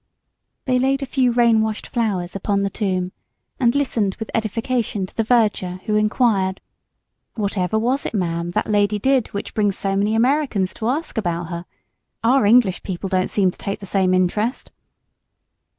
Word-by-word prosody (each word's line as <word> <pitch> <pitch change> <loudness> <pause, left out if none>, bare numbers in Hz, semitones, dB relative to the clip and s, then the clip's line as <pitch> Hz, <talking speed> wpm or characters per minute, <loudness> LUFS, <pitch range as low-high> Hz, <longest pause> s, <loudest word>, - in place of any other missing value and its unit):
They 255 -1 +2
laid 270 +2 +1
a - - -2
few 255 -2 +1
rain 235 -2 +4
washed 220 -1 -2
flowers 200 -7 -2
upon 200 +1 0
the 200 - -1
tomb, 185 -3 -1 0.5
and 240 -1 +3
listened 230 -9 0
with 220 - -7
edification 225 -1 -1
to - - -16
the 225 - +1
verger, 210 -6 +1
who 210 - 0
inquired, 210 -3 +2 0.8
"Whatever 200 -2 -1
was 250 +5 0
it, - - -6
ma'am, 170 -3 -1
that - - 0
lady 205 0 +2
did 260 +2 +2
which 200 - -6
brings 205 -2 +1
so 195 -1 -1
many 210 +3 +1
h'Americans 245 -6 +1
to 220 - -3
h'ask 280 -1 -1
about 170 -4 -2
her? 170 0 -5 0.6
Our 250 0 +4
h'English 220 -4 +4
people 190 0 -5
don't 185 -1 +1
seem 190 -3 +2
to - - -19
take 200 - -4
the 200 - -8
same 190 -1 +1
h'interest." 185 +6 0
210 Hz, 170 wpm, -21 LUFS, 190-235 Hz, 0.8 s, rain